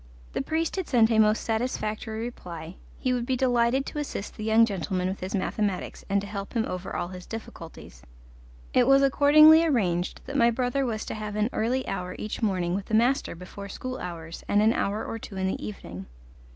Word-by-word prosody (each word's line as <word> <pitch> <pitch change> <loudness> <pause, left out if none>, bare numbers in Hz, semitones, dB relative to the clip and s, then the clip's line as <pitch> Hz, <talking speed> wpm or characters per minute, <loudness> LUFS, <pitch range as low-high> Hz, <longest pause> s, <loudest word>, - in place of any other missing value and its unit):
The - - -1
priest 325 +3 -1
had 375 - -2
sent 235 -4 +4
a 220 - +3
most 215 0 +4
satisfactory 220 -1 -2
reply; 175 -8 -7 0.2
he 255 - 0
would 240 -1 -2
be 260 - +1
delighted 245 +1 +2
to 295 - -5
assist 275 -8 -5
the 215 - -7
young 220 +1 +5
gentleman 185 -2 -2
with 190 +1 -3
his 190 +3 -4
mathematics, 200 0 -2
and 200 +1 +3
to - - -6
help 200 -1 -6
him 230 -2 +1
over 185 +1 -5
all 175 - -2
his 180 -1 -9
difficulties; 165 - -9 0.7
it 250 -1 +4
was 275 0 +6
accordingly 305 +4 +7
arranged 185 - 0
that - - -7
my 235 0 +5
brother 250 +3 0
was 220 -2 -3
to - - -4
have 215 -1 -5
an 215 +3 0
early 250 +4 0
hour 180 -2 -4
each 215 - -5
morning 185 -5 0
with 195 +1 -2
the 220 - 0
master 245 +2 +2
before 190 +3 -9
school 255 +5 -5
hours, 165 -2 -7
and 205 +1 +3
an 220 +1 +4
hour 210 0 -1
or 225 - -5
two 195 - -9
in 190 - -1
the 190 - -2
evening. 95 - -7
215 Hz, 205 wpm, -27 LUFS, 190-245 Hz, 0.7 s, accordingly